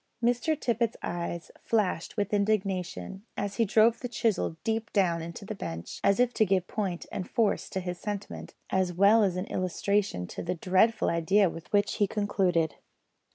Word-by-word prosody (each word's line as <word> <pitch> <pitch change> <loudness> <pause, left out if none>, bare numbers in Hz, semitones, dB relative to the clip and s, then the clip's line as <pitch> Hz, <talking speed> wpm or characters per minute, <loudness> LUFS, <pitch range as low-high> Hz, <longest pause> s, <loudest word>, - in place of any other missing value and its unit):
Mr 245 +6 +1
Tippet's 235 -3 0
eyes 170 0 -4
flashed 205 -4 0
with 205 0 -1
indignation, 195 - -1 0.2
and 205 -1 -2
he 230 +3 +2
drove 220 +3 +4
the 245 - -4
chisel 215 -8 0
deep 225 +1 -1
down 175 -5 +2
into 170 +4 -7
the 215 - -4
bench, 85 - -6
as 200 +3 +3
if 245 0 +3
to 220 - +3
give 190 -3 +1
point 190 -5 -3
and 185 - -4
force 225 -4 +1
to 190 - -2
his 180 -1 -5
sentiment, 205 -1 -6 0.2
as 190 -1 +1
well 200 +5 +5
as 190 -3 +1
an 185 +1 -2
illustration 185 - -1
of - - -5
the 180 - 0
dreadful 190 +6 +2
idea 180 +3 +3
with 165 - -10
which 205 0 +2
he 205 - +3
concluded. 185 -6 +1
200 Hz, 175 wpm, -28 LUFS, 180-215 Hz, 0.2 s, well